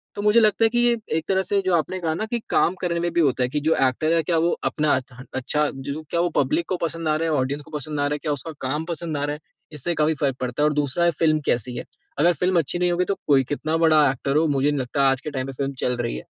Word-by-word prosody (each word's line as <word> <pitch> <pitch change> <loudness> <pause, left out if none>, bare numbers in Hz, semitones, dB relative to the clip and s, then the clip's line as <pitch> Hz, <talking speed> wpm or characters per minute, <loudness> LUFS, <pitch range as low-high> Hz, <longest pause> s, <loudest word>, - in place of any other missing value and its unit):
तो 205 - -4
मुझे 210 +2 +5
लगता 215 0 +3
है - - +4
कि 240 +1 0
ये 240 -1 +3 0.2
एक 160 - -3
तरह 190 0 +2
से 200 +2 +1
जो 185 - +1
आपने 170 +4 -1
कहा 160 -2 -1
न 215 - -2
कि 240 - 0
काम 175 - +3
करने 170 -1 -1
में 175 0 -1
भी 170 - +3
होता 135 -4 +2
हैं 125 - 0
कि 150 - 0
जो 160 - +4
एक्टर 155 +6 0
है 165 - +3
क्या 165 +1 0
वो 170 +2 +2 0.2
अपना 150 -1 +1
अ, 130 -1 -9
अच्छा 150 +3 0
जो 140 +3 -5
क्या 170 - -1
वो 175 - +1
पब्लिक 145 +5 +1
को 185 - 0
पसंद 165 -1 -3
आ 155 - +2
रहा 165 +1 0
हैं? 155 - +1
ऑडियंस 140 +3 -2
को - - -17
पसंद 150 0 -4
आ 145 - +1
रहा 145 - -1
हैं? 150 - -3
क्या 150 - 0
उसका 145 +3 -4 0.2
काम 150 +4 -2
पसंद 165 -2 -4
आ 145 - -2
रहा 145 - -2
है? - - -12 0.3
इससे 150 +4 -2
काफ़ी 155 +1 +2
फ़र्क 135 -3 +1
पड़ता 125 +3 -1
है। - - +5
और - - -2
दूसरा 145 +3 0
है 170 - +4
फ़िल्म 155 -2 +3
कैसी 120 +1 0
है? - - -5 0.3
अगर 175 +3 +5
फ़िल्म 180 +3 +1
अच्छी 165 +3 -2
नहीं 180 0 +2
होगी 175 +1 +1
तो 200 - -1
कोई 135 -2 +5
कितना 155 +2 -1
बड़ा 155 -3 +5
एक्टर 135 +2 -3
हो, 160 0 +3
मुझे 145 0 +2
नहीं 145 - -1
लगता 135 +2 +1
आज 135 -1 0
के - - -5
टाइम 130 -1 -3
पे - - -4
फ़िल्म 140 +1 -3
चल 125 -1 +1
रही 120 -1 -2
है। - - -8
155 Hz, 310 wpm, -23 LUFS, 140-170 Hz, 0.3 s, मुझे